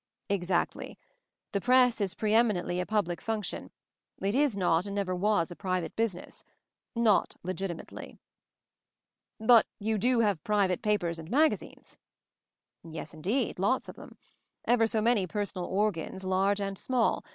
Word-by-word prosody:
"Exactly. 180 Hz, -3 st, -1 dB, 0.5 s
The 200 Hz, -, -1 dB
Press 250 Hz, -1 st, +4 dB
is 195 Hz, -3 st, -1 dB
pre 215 Hz, -1 st, 0 dB
eminently 205 Hz, -6 st, +2 dB
a 180 Hz, -, -2 dB
public 200 Hz, -5 st, -1 dB
function 220 Hz, -3 st, -3 dB, 0.3 s
— -, -, -62 dB
it 200 Hz, -, +1 dB
is 270 Hz, -5 st, +2 dB
not 180 Hz, 0 st, +2 dB
and 200 Hz, -, -5 dB
never 195 Hz, -2 st, -1 dB
was 180 Hz, -2 st, +1 dB
a -, -, -7 dB
private 185 Hz, -2 st, -3 dB
business 220 Hz, -6 st, -3 dB, 0.3 s
— -, -, -60 dB, 0.2 s
not -, -, +1 dB
legitimately." 185 Hz, -1 st, -6 dB, 1.2 s
"But 225 Hz, +1 st, +6 dB
you 215 Hz, 0 st, -1 dB
do 245 Hz, +2 st, +3 dB
have 205 Hz, -8 st, +1 dB
private 200 Hz, -4 st, +1 dB
papers 180 Hz, -6 st, 0 dB
and 160 Hz, 0 st, -9 dB
magazines 300 Hz, +7 st, 0 dB, 0.4 s
?" -, -, -62 dB
"Yes 165 Hz, 0 st, -8 dB
indeed, 200 Hz, -, -1 dB
lots 245 Hz, +7 st, +1 dB
of -, -, -9 dB
them. -, -, -13 dB, 0.5 s
Ever 230 Hz, -2 st, +3 dB
so 220 Hz, -1 st, 0 dB
many 225 Hz, -5 st, +2 dB
personal 200 Hz, -2 st, -3 dB
'organs/ 190 Hz, -2 st, -1 dB
large 195 Hz, +2 st, +1 dB
and 195 Hz, -1 st, -3 dB
small. 250 Hz, -3 st, +1 dB
200 Hz, 150 wpm, -29 LUFS, 180-225 Hz, 1.2 s, But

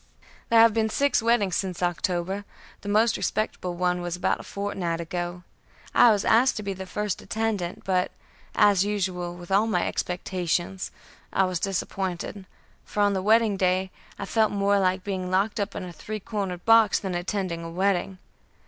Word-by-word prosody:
"There 230 Hz, -, +6 dB
have 225 Hz, -1 st, +7 dB
been 220 Hz, 0 st, +1 dB
six 280 Hz, +2 st, +2 dB
weddings 225 Hz, -5 st, +2 dB
since 185 Hz, -2 st, -2 dB
October; 175 Hz, +2 st, -1 dB, 0.4 s
the 205 Hz, -, -6 dB
most 220 Hz, +3 st, +3 dB
respectable 185 Hz, -4 st, -2 dB
one 180 Hz, 0 st, 0 dB
was 175 Hz, -1 st, -3 dB
about 180 Hz, -, 0 dB
a -, -, -8 dB
fortnight 190 Hz, -4 st, -3 dB
ago; 175 Hz, +1 st, -4 dB, 0.5 s
I 245 Hz, -, +7 dB
was 210 Hz, -3 st, +2 dB
asked 245 Hz, +3 st, +4 dB
to 210 Hz, -, -4 dB
be 200 Hz, -1 st, -2 dB
the 190 Hz, 0 st, -8 dB
first 210 Hz, +1 st, -3 dB
attendant, 215 Hz, -6 st, -2 dB
but, 185 Hz, -1 st, +1 dB, 0.5 s
as 205 Hz, -3 st, +5 dB
usual 185 Hz, -4 st, -2 dB
with 175 Hz, +1 st, -11 dB
all 205 Hz, +3 st, +4 dB
my 180 Hz, -6 st, +1 dB
expectations, 180 Hz, 0 st, -2 dB, 0.4 s
I 195 Hz, -, +3 dB
was 185 Hz, -2 st, -1 dB
disappointed, 190 Hz, 0 st, -3 dB, 0.4 s
for 210 Hz, -, -3 dB
on 205 Hz, 0 st, +4 dB
the 190 Hz, -, -1 dB
wedding 215 Hz, 0 st, +3 dB
day 185 Hz, 0 st, +1 dB, 0.3 s
I 200 Hz, -, -4 dB
felt 220 Hz, +1 st, +2 dB
more 200 Hz, 0 st, +2 dB
like 185 Hz, 0 st, +1 dB
being 185 Hz, -2 st, -3 dB
locked 200 Hz, +4 st, +1 dB
up 200 Hz, 0 st, -2 dB
in -, -, -4 dB
a 180 Hz, -1 st, -8 dB
three 215 Hz, +5 st, -6 dB
cornered 195 Hz, -4 st, -4 dB
box 225 Hz, -2 st, +6 dB
than 190 Hz, -2 st, -4 dB
attending 175 Hz, -1 st, -2 dB
a 165 Hz, -, -6 dB
wedding. 190 Hz, +1 st, 0 dB
190 Hz, 175 wpm, -26 LUFS, 180-210 Hz, 0.5 s, have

